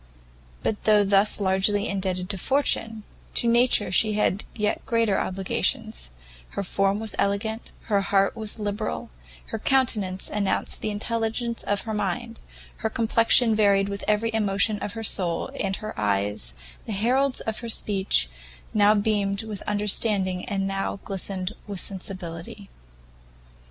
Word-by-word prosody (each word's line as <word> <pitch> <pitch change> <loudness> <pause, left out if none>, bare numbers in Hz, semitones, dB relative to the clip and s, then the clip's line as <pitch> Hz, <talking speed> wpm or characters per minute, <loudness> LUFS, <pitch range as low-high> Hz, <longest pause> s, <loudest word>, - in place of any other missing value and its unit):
But 210 - -2
though 210 -1 +5
thus 200 +2 +3
largely 200 +2 +3
indebted 185 -2 -2
to 195 - -5
fortune, 225 -4 +1 0.3
to 235 - +2
nature 235 -4 +3
she 215 +3 +3
had 205 -1 +1
yet 210 -1 -1
greater 230 -4 +2
obligations: 180 - 0 0.5
her 200 - 0
form 195 +2 +1
was 220 -1 -2
elegant, 220 +3 -1
her 205 -3 +1
heart 195 0 +2
was 220 -1 -2
liberal; 205 - -3 0.4
her - - -3
countenance 210 -8 +1
announced 205 -2 0
the - - -1
intelligence 230 +2 -2
of 205 -1 0
her 220 - -4
mind, 215 +3 -3 0.4
her 220 - -1
complexion 230 +1 +4
varied 200 -2 +3
with 200 0 -5
every 220 +2 +1
emotion 210 0 +1
of 205 - -4
her 225 - -5
soul, 175 -5 +1
and 195 -1 0
her 215 +2 -6
eyes, 100 - -1 0.3
the 220 - -2
heralds 255 +6 +2
of 220 -1 -3
her 235 - -6
speech, 195 - +1 0.5
now 210 0 +5
beamed 205 -1 +1
with 215 -3 -6
understanding 205 -3 +1
and 195 -2 -1
now 195 0 -2
glistened 195 0 -2
with 200 -2 -5
sensibility. 185 0 -7
205 Hz, 140 wpm, -25 LUFS, 195-220 Hz, 0.5 s, though